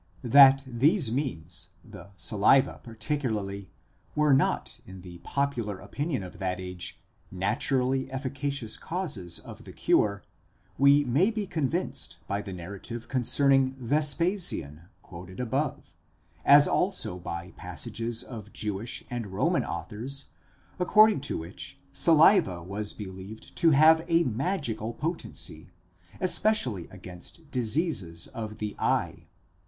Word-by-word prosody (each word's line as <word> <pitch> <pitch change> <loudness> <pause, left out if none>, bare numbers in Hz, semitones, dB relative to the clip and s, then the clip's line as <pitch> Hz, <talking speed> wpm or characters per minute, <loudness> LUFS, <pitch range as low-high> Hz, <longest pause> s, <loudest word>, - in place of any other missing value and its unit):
That 135 +2 +7
these 130 - +2
means, 90 - -3 0.2
the - - -12
saliva 110 +9 +3
particularly, 110 -5 -3 0.5
were 150 -2 +4
not 135 - +1
in 95 -1 -10
the 90 -1 -11
popular 120 -5 -2
opinion 140 - -3
of 90 - -10
that 90 -1 -2
age 90 -2 -6 0.3
naturally 125 +8 0
efficacious 135 -2 -3
causes 150 - -3
of - - -11
the - - -11
cure, 100 -1 +1 0.6
we 140 +1 +6
may 145 - +3
be 215 -2 -3
convinced 150 - -2
by 100 +1 -1
the 100 -1 -8
narrative 100 +6 -7
concerning 135 +1 +2
Vespasian 145 - 0 0.2
quoted 95 +1 -11
above, 130 +4 -2 0.5
as 145 +1 +7
also 110 - 0
by 85 +1 -6
passages 115 0 -4
of 110 -4 -9
Jewish 105 +2 -3
and 120 -3 -3
Roman 95 0 +1
authors, 135 +6 -5 0.5
according 210 -1 +5
to - - -1
which 85 +4 -8 0.2
saliva 155 - +5
was 100 +3 -5
believed 95 +1 -9
to 165 - +5
have 160 +2 +6
a 170 0 +4
magical 120 - -2
potency, 150 - -4 0.5
especially 180 - +2
against 95 - -11
diseases 115 - 0
of 110 -4 -7
the 105 -2 -4
eye. - - -1
120 Hz, 115 wpm, -28 LUFS, 95-145 Hz, 0.6 s, That